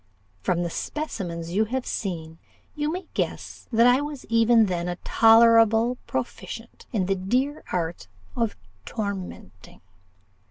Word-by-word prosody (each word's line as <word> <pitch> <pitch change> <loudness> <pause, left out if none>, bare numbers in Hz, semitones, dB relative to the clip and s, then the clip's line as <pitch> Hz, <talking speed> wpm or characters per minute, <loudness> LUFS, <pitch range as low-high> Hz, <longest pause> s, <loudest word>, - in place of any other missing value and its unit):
From 175 -1 0
the 170 - -3
specimens 170 - -4
you 210 +5 +2
have 255 +3 -3
seen, 165 -5 -4 0.3
you 300 +1 -1
may 365 +3 -4
guess - - -4
that 230 0 +5
I 250 +3 +5
was 290 -2 -6
even 230 0 +5
then 175 -3 -2
a 175 - -2
tolerable 230 +1 +5
proficient - - -6
in 200 -6 0
the 195 - +1
dear 250 +10 -1
art 170 - -3 0.3
of 230 -3 -1 0.3
tormenting. 190 - -6
220 Hz, 130 wpm, -25 LUFS, 180-245 Hz, 0.3 s, that